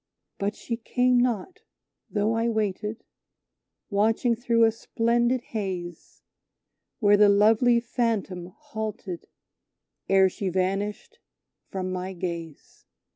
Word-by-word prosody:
But 200 +1 -1
she 230 - -4
came 250 +1 +2
not 245 - -1 0.5
though 215 +1 +1
I 230 +1 +1
waited, 215 0 -2 0.9
watching 225 +4 +2
through 230 0 +2
a 225 - +5
splendid 235 +2 +1
haze, 185 -7 -6 0.7
Where 205 -2 +5
the 205 0 +6
lovely 220 +4 +5
Phantom 225 -7 -2
halted 210 -2 -6 0.8
ere 190 0 +6
she 190 +1 -3
vanished 195 - -2 0.5
from 185 -1 -3
my 185 +1 -4
gaze. 170 -4 -7
210 Hz, 105 wpm, -26 LUFS, 190-230 Hz, 0.9 s, the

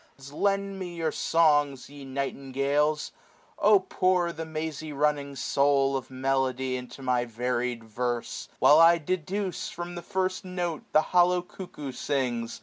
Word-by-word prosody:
Lend 195 +3 0
me 175 -2 -6
your 165 -2 -1
soi^, 145 -5 +2
ye 145 0 -11
nightingales! 140 +2 -1 0.5
oh 205 -1 +5
pour 185 -2 +1
The 160 0 -6
mazy 155 -1 -4
running 145 -1 0
soul 140 +1 +2
of 130 - -4
melody 130 -1 -1
Into 125 +2 -8
my 125 -1 +1
varied 120 0 -2
verfe; 120 +2 -3
while 150 - +6
I 165 +1 +7
deduce, 185 +3 -3
575 - - -12
From 175 +1 -5
the 175 - -6
first 185 0 -2
note 180 -3 -3
the 155 - +5
hollow 180 0 +4
cuckoo 175 -7 -8
sings. 125 -4 -2
145 Hz, 145 wpm, -27 LUFS, 130-175 Hz, 0.5 s, I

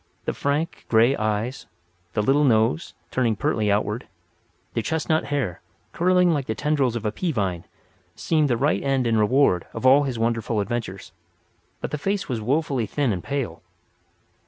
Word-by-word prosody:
The - - -1
frank, 145 +4 -2
grey 115 +4 +4
eyes, 110 +3 -2 0.5
the 105 - 0
little 140 +5 +3
nose, 115 +4 +2 0.2
turning 120 -4 +1
pertly 105 +1 0
outward; 105 +3 -1 0.7
the 115 - 0
chestnut 160 +4 0
hair, 135 -12 -2 0.3
curling 180 0 +3
like 140 -4 -2
the 110 - -2
tendrils 140 -4 +1
of 115 -2 -4
a 105 - +1
pea 175 - -2
vine, 95 - -2 0.5
seemed 155 -3 +1
the 120 - +2
right 145 +5 +1
end 135 -2 +1
and 115 -1 +2
reward 105 -4 +3
of - - -4
all 135 +3 +7
his 130 -4 -3
wonderful 115 -1 0
adventures. 105 -3 -4 0.7
But - - -4
the 150 - -3
face 195 +4 -1
was 120 -4 -3
wofully 135 -1 0
thin 140 -3 0
and 90 - -5
pale. 140 -3 -3
125 Hz, 165 wpm, -24 LUFS, 110-145 Hz, 0.7 s, all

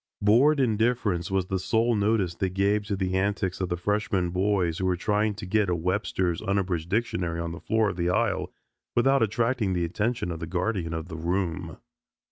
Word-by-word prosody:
Bored 125 +9 +4
indifference 110 -6 +1
was 95 -1 0
the 95 0 -2
sole 115 +5 +1
notice 105 -4 +1
they 95 +2 -1
gave 100 +3 +1
to 100 -1 -2
the 95 -1 -1
antics 95 -1 -1
of 90 - -1
the 90 - -1
freshmen 100 -1 0
boys 90 -3 +1
who 95 - 0
were 90 - +2
trying 105 +3 0
to 110 - -7
get 105 +1 +1
a 90 - +1
Webster's 90 0 -1
unabridged 95 -5 -1
dictionary 100 -6 -1
on 85 0 -3
the 85 - -7
floor 110 0 +1
of 90 - -10
the 85 0 0
aisle 95 -3 0 0.4
without 135 +2 +4
attracting 115 -1 +1
the 90 -1 0
attention 110 +3 -1
of 80 - -5
the 80 - -5
guardian 90 -2 -2
of 80 +1 -5
the 80 -3 -7
room. 85 -1 -2
95 Hz, 195 wpm, -26 LUFS, 90-110 Hz, 0.4 s, Bored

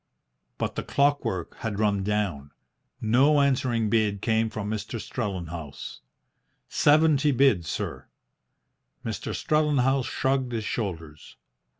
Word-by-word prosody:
But - - -2
the - - -3
clockwork 140 - 0
had 110 -3 -4
run 105 -2 +1
down. 95 -9 -1 0.5
No 130 +7 +4
answering 125 -5 +2
bid 105 -2 +1
came 110 +1 +1
from 110 -2 -5
Mr. 110 +2 -4
Strellenhaus. 85 - -5 0.7
"Seventy 150 -1 +4
bid, 125 - +3
sir." - - -4 1.0
Mr. 110 -4 -4
Strellenhaus 140 -4 +2
shrugged 130 -2 0
his 110 -2 -2
shoulders. 80 -10 -5
110 Hz, 105 wpm, -26 LUFS, 100-135 Hz, 1.0 s, No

